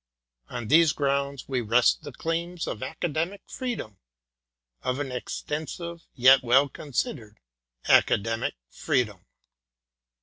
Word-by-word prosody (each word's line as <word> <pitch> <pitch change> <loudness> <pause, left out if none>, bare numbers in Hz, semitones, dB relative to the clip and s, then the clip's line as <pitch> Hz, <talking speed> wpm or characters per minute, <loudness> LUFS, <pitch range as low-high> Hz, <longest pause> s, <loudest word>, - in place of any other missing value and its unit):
On 120 -2 -5
these 160 +3 +5
grounds 140 -1 -1
we 130 -2 -1
rest 120 +2 +3
the 145 -1 -8
claims 165 +5 -3
of 110 - -5
Academic 165 +7 -3
Freedom 230 - -5 0.8
of 130 0 -1
an 140 -2 -3
extensive 160 +6 -5
yet 130 +2 +7
well 130 +3 +4
considered 120 -6 -4 0.5
Academic 115 +2 +3
Freedom. 105 - -1
140 Hz, 105 wpm, -26 LUFS, 120-160 Hz, 0.8 s, yet